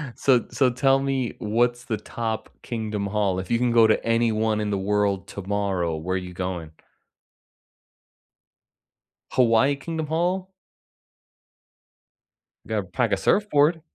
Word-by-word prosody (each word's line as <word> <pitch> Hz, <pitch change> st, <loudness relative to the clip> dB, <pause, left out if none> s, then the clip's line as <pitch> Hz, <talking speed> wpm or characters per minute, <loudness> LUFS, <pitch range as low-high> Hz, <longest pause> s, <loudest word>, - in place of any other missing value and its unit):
So 125 Hz, -4 st, +3 dB
so 130 Hz, -2 st, +3 dB
tell 135 Hz, +2 st, +3 dB
me 135 Hz, -3 st, -1 dB
what's 120 Hz, +3 st, 0 dB
the 110 Hz, -, -2 dB
top 110 Hz, +1 st, -4 dB
Kingdom 110 Hz, -4 st, -3 dB
Hall? 100 Hz, -2 st, 0 dB
If 95 Hz, -, -6 dB
you 120 Hz, -, +2 dB
can 120 Hz, 0 st, +1 dB
go 115 Hz, -1 st, +6 dB
to 110 Hz, -, +2 dB
anyone 110 Hz, -2 st, +1 dB
in 105 Hz, -1 st, -1 dB
the 100 Hz, -, 0 dB
world 100 Hz, 0 st, 0 dB
tomorrow, 95 Hz, -4 st, -2 dB
where 90 Hz, +4 st, -2 dB
you 90 Hz, -1 st, -7 dB
going? 90 Hz, -3 st, -4 dB, 2.6 s
Hawaii 125 Hz, +3 st, +4 dB
Kingdom 160 Hz, +2 st, -4 dB
Hall? 180 Hz, +4 st, -1 dB, 2.2 s
Gotta -, -, -1 dB
pack -, -, -1 dB
a -, -, +2 dB
surfboard. 160 Hz, -5 st, +2 dB
110 Hz, 125 wpm, -24 LUFS, 100-130 Hz, 2.6 s, go